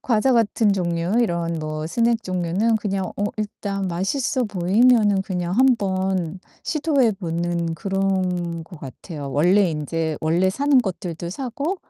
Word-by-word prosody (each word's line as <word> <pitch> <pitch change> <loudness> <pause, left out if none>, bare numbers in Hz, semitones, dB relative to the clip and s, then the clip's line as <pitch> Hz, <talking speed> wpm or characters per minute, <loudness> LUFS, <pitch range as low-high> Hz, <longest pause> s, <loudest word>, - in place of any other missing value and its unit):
과자 245 +2 +2
같은 225 -2 +3
종류, 170 -1 -1
이런 170 -6 -1
뭐 155 0 -4
스낵 230 +4 +1
종류는 185 +5 +1
그냥 195 -3 -2
어 205 - -1
일단 200 -2 -3
맛있어 220 +9 -1
보이면은 205 +1 +3
그냥 180 -2 -3
한번 190 -8 +1 0.2
시도해 285 -7 +2
보는 170 -2 -2
그런 185 -2 -1
거 170 - -12
같아요. 145 +1 -8
원래 180 +6 +3
인제 160 +1 -2
원래 170 +4 +2
사는 280 +6 +3
것들도 175 -6 -3
사고 275 - -3
190 Hz, 270 characters per minute, -22 LUFS, 170-220 Hz, 0.2 s, 같은